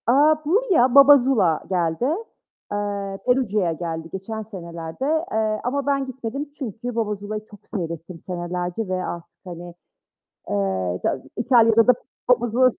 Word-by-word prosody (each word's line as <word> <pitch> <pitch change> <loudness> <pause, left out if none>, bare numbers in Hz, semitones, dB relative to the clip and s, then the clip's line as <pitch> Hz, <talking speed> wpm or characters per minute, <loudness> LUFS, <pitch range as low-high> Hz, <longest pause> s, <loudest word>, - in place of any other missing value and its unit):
Aaa, 290 +6 +5
buraya 365 - +4
BaBa 280 +1 +10
ZuLa 235 - +2
geldi. 175 +3 0 0.7
Eee, 200 -1 -3
Perugia'ya 215 -8 +2
geldi 165 -1 -5
geçen 220 +3 -5
senelerde. 170 0 -6 0.3
Eee, 215 -1 0
ama 275 +3 -1
ben 275 -1 +1
gitmedim 260 +2 -5
çünkü 245 -3 -5
BaBa 215 -2 0
ZuLa'yı 210 +1 -6
çok 205 -2 -17
seyrettim 170 -3 -5
senelerce 180 +3 -3
ve 185 0 -2
artık, 170 -1 -7
hani, 175 -1 -8 0.8
ııı, 95 -3 0
İta 130 - -1
İtalya'da 230 -2 +5
da 250 - +8 0.4
BaBa 240 -1 +4
ZuLa. 255 +3 +4
210 Hz, 135 wpm, -23 LUFS, 175-250 Hz, 0.8 s, BaBa